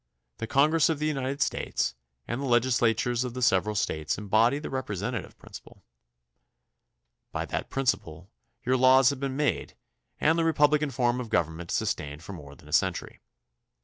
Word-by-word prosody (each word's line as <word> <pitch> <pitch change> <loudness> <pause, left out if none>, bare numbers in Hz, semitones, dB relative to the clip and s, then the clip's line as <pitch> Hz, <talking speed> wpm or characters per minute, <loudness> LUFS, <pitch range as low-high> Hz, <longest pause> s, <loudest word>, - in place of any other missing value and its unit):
The 115 - -4
Congress 150 +6 +3
of 160 - 0
the 150 - -2
United 140 -1 0
States 60 - -2 0.3
and 120 +3 -3
the - - -2
legislatures 120 -1 +2
of 125 -1 -5
the 130 - -4
several 105 0 +2
States 80 -6 -1
embody 110 +6 +2
the 150 - -6
repre 130 -7 -3
sentative 115 +5 -4
principle. - - -13 1.5
By - - -3
that - - -4
principle 95 -9 -2 0.3
your 130 +1 +2
laws 130 +1 +6
have 140 - -6
been 135 -1 -3
made 150 -1 -1 0.4
and 160 +2 +3
the - - +2
republican 150 -2 +3
form 125 -1 0
of 120 - -7
government 85 -3 -1
sustained 75 +2 -2
for 100 - -8
more 70 -5 -11
than - - -18
a - - -9
century. - - 0
125 Hz, 165 wpm, -27 LUFS, 105-140 Hz, 1.5 s, laws